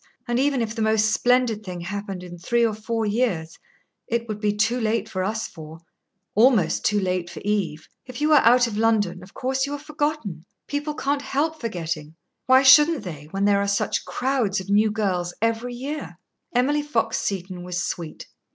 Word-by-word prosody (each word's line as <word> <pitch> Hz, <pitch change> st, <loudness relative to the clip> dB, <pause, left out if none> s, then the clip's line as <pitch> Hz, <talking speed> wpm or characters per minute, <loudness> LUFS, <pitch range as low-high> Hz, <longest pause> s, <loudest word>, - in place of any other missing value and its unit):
And 240 Hz, +1 st, 0 dB
even 275 Hz, -3 st, +2 dB
if 220 Hz, -1 st, -4 dB
the 225 Hz, -, -4 dB
most 220 Hz, 0 st, +3 dB
splendid 245 Hz, -2 st, +2 dB
thing 180 Hz, -3 st, -6 dB
happened 195 Hz, 0 st, -5 dB
in 175 Hz, -1 st, -9 dB
three 235 Hz, +6 st, +2 dB
or 225 Hz, -, 0 dB
four 220 Hz, +1 st, -2 dB
years, 205 Hz, -8 st, -1 dB, 0.5 s
it 235 Hz, 0 st, -1 dB
would 215 Hz, -2 st, -4 dB
be 210 Hz, -1 st, +1 dB
too 220 Hz, +4 st, +1 dB
late 220 Hz, -1 st, 0 dB
for 185 Hz, -4 st, -3 dB
us 215 Hz, +3 st, -2 dB
four 160 Hz, -1 st, -11 dB, 0.6 s
almost 210 Hz, -, +3 dB
too 210 Hz, 0 st, +2 dB
late 180 Hz, -2 st, -1 dB
for -, -, -8 dB
Eve. 175 Hz, -7 st, -1 dB, 0.2 s
If 255 Hz, +1 st, -8 dB
you 305 Hz, +1 st, +3 dB
are 295 Hz, -, +7 dB
out 245 Hz, +2 st, +5 dB
of 215 Hz, -3 st, -3 dB
London, 210 Hz, -5 st, +1 dB
of 185 Hz, +2 st, -15 dB
course 265 Hz, +1 st, -1 dB
you 285 Hz, -, -4 dB
are -, -, -2 dB
forgotten. 295 Hz, -, -3 dB, 0.2 s
People 295 Hz, +1 st, -3 dB
can't 280 Hz, -1 st, -1 dB
help 310 Hz, +3 st, -1 dB
forgetting. 165 Hz, -8 st, -4 dB, 0.3 s
Why 260 Hz, +1 st, +6 dB
shouldn't 295 Hz, +1 st, +7 dB
they, 155 Hz, -6 st, -7 dB
when 195 Hz, +3 st, -1 dB
there 200 Hz, -1 st, +3 dB
are 200 Hz, -, 0 dB
such 200 Hz, 0 st, 0 dB
crowds 245 Hz, -6 st, 0 dB
of 190 Hz, +1 st, -6 dB
new 210 Hz, +2 st, +4 dB
girls 185 Hz, -5 st, -1 dB
every 230 Hz, +2 st, -1 dB
year?" 255 Hz, -, -6 dB, 0.3 s
Emily 275 Hz, +5 st, +2 dB
Fox 230 Hz, -6 st, 0 dB
Seton 185 Hz, -2 st, -3 dB
was 180 Hz, 0 st, -3 dB
sweet. 165 Hz, -3 st, -5 dB
220 Hz, 190 wpm, -24 LUFS, 185-250 Hz, 0.6 s, are